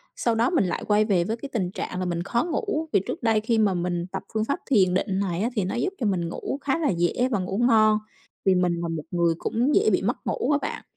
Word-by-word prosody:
sau 235 -2 0
đó 230 +3 +2
mình 330 - +2
lại 175 - -2
quay 210 0 +3
về 185 -5 +2
với 225 +5 -3
cái 275 +4 -8
tình 185 -5 -1
trạng 180 - -5
là 185 - -2
mình 170 -1 -2
khó 235 +8 0
ngủ. 325 -2 -2
Vì - - +5
trước - - -5
đây 220 -2 +3
khi 230 +1 +1
mà 205 -3 +3
mình 175 0 -2
tập 190 - -4
phương 220 0 0
pháp 280 - -1
thiền 190 -8 +3
định 190 +1 0
này 185 -2 -1
á, 235 - +1
thì 205 - +1
nó 190 - -3
giúp 375 +11 -1
cho 235 - -1
mình 175 -4 0
ngủ 275 - -4
khá 280 +3 0
là 320 - 0
dễ 175 +8 +1
và 220 - +1
ngủ 190 +2 -3
ngon, 215 -2 +5 0.5
vì 190 -1 +4
mình 180 -1 +2
là 170 - -2
một 160 -2 -3
người 170 -1 +2
cũng 250 +6 0
dễ 435 +2 +4
bị - - +2
mất - - -2
ngủ - - 0
á 290 - +4
bạn. - - -4
210 Hz, 280 wpm, -25 LUFS, 180-240 Hz, 0.5 s, Vì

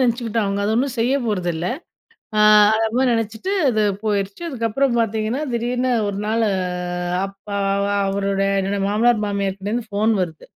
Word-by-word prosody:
நெனச்சுக்கிட்டோம். 235 -3 0
அவுங்க 200 0 -1
அது 215 - +1
ஒண்ணும் 260 +1 0
செய்ய 245 +4 +2
போறதில்ல. 175 -5 -1 0.7
அ - - +2 0.4
அந்தமாரி 225 +4 +1
நினைச்சுட்டு, 225 - -2 0.2
அது 215 -3 +1 0.2
போயிருச்சு. 205 - -2
அதுக்கப்பறம் 245 -1 0
பார்த்தீங்கன்னா, 225 +4 -1
திடீர்னு 245 +2 -1 0.2
ஒரு 200 -1 -3
நாள் 225 +1 +1 0.8
அப்பா 195 +1 -7 0.5
அவரோட 195 0 -1 0.2
என்னோட 195 +1 -1
மாமனார், 220 +2 +2
மாமியார்க்கிட்டேருந்து 200 +3 -3
ஃபோன் 215 +2 +1
வருது. 160 -3 -5
220 Hz, 130 wpm, -21 LUFS, 200-235 Hz, 0.8 s, செய்ய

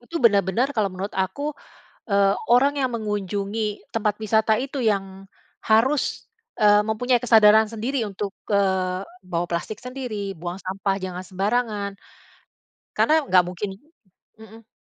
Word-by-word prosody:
Itu 245 +8 -7
benar 205 -3 +6
benar 245 +9 0
kalau 215 -6 +1
menurut 190 +2 -6
aku, 195 +11 -2 0.6
eee, 200 -1 +3 0.2
orang 270 +4 +5
yang 265 -3 0
mengunjungi 210 -1 -3
tempat 210 -1 0
wisata 220 0 +2
itu 270 0 -3
yang 195 -3 -1 0.4
harus, 235 +6 +1 0.3
eee, 210 -1 +5
mempunyai 240 +3 0
kesadaran 220 -2 +6
sendiri 235 +3 -2
untuk, 200 -1 -5 0.2
eee, 190 -2 +1 0.2
bawa 175 -1 -2
plastik 170 +5 -4
sendiri, 245 -7 -5
buang 175 +2 -6
sampah 195 +1 -2
jangan 185 -1 -5
sembarangan, 205 +2 -1 1.0
karena 310 -1 +3
gak 185 -7 +5
mungkin 185 +3 -4 0.7
mhm. 220 0 -15
210 Hz, 130 wpm, -23 LUFS, 195-235 Hz, 1.0 s, benar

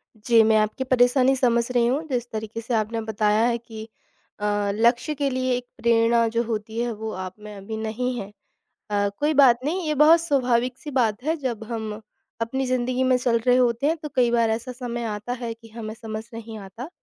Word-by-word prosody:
जी, 225 +1 +4
मैं 220 0 +4
आपकी 215 +5 0
परेशानी 255 +1 +3
समझ 235 -1 +1
रही 240 -1 +3
हूँ। 280 +6 0
जिस 245 -2 -2
तरीक़े 220 +1 -5
से 235 +2 -4
आपने 225 +1 -1
बताया 215 0 +1
है 235 -1 +1
कि 225 -1 -10 0.5
अ, 205 -1 0
लक्ष्य 240 +6 +2
के 280 0 0
लिए 255 -1 0
एक 250 - -7
प्रेरणा 230 0 +3
जो 230 - +2
होती 220 0 -4
है 240 0 0
वो 220 +1 -5
आप 185 0 -6
में 210 0 -10
अभी 210 +3 -6
नहीं 225 +4 -2
है। 195 - -6 0.6
अ, 205 0 +1
कोई 300 +1 +1
बात 260 -4 +6
नहीं, 340 +2 -1
ये 305 - +1
बहुत 310 +3 +6
स्वाभाविक 255 -5 +1
सी 295 - -8
बात 240 -4 +1
है। 320 +2 +1
जब 235 -4 -3
हम 220 -2 -5 0.4
अपनी 265 +3 -1
ज़िन्दगी 255 0 0
में 255 - +5
चल 245 -2 +1
रहे 250 0 +5
होते 245 +2 +2
हैं 325 +2 +2
तो 300 -1 -7
कई 245 -2 +4
बार 230 -1 +2
ऐसा 235 +3 -3
समय 240 -1 -5
आता 210 +3 -4
है 230 -1 -3
कि 230 0 -17
हमें 220 -1 -6
समझ 220 -1 -6
नहीं 225 -1 -8
आता। 205 - -9
235 Hz, 210 wpm, -24 LUFS, 220-255 Hz, 0.6 s, बात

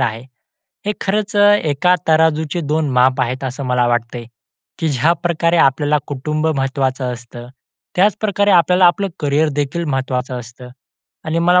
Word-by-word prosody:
आहे. 115 -3 -2 0.6
हे 210 - +1
खरंच 210 +1 -2
अ, - - +4 0.2
एका 155 +5 +2
तराजूचे 160 0 +2
दोन 155 0 -1
माप 130 +1 +3
आहेत 125 +2 -2
असं 130 +2 -5
मला 125 -1 +1
वाटत 120 0 -1
आहे. 120 - -7 0.5
की 165 - -1
ज्याप्रकारे 170 +4 +1
आपल्याला 145 +1 +2
कुटुंब 150 +3 -3
महत्वाचं 135 -1 -1
असतं. 120 0 -10 0.5
त्याचप्रकारे 205 +1 +2
आपल्याला 180 0 +4
आपलं 195 +3 +1
करियरदेखील 145 +1 0
महत्वाचं 130 -3 -3
असतं. 120 +1 -12 0.6
आणि 160 +1 -1
मला 180 +2 +4
145 Hz, 140 wpm, -17 LUFS, 130-170 Hz, 0.6 s, अ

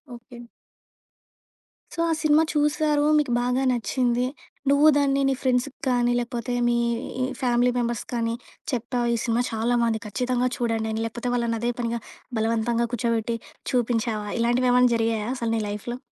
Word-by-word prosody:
Okay. 240 +1 -13 1.5
So 335 - -8
ఆ - - +2
cinema 310 +1 +5
చూసారు. 295 0 +2
మీకు 285 -5 -1
బాగా 250 +2 +1
నచ్చింది. 245 +1 0 0.4
నువ్వు 285 +2 +5
దాన్ని 275 -1 +2
నీ - - +2
ఫ్రెండ్స్‌కి 255 +1 0
కానీ 245 -1 +2
లేపోతే 240 0 -3
మీ 240 - +2 0.5
ఇ - - +2 0.2
ఫ్యామిలీ 245 0 +3
మెంబర్స్‌కి 235 -2 -2
కానీ 230 0 0 0.4
చెప్పావు 240 0 -1
ఈ - - +2
సినిమా 235 +1 +1
చాలా 225 +2 0
బావుంది 225 -1 0
ఖచ్చితంగా 250 +4 0
చూడండని 225 -2 -1
లేకపోతే 235 +2 -4
వాళ్ళని 235 -1 0
అదే 240 +1 +1
పనిగా 235 0 -1 0.4
బలవంతంగా 230 +1 +1
కూర్చోబెట్టి 230 0 0 0.3
చూపించావా? 230 -3 0
ఇలాంటివి 240 +2 +2
ఏమైనా 250 -1 +5
జరిగాయా 225 -1 0
అసలు 230 -1 -2
నీ 220 - 0
లైఫ్‌లో? 210 +4 -5
240 Hz, 145 wpm, -25 LUFS, 230-250 Hz, 1.5 s, సినిమా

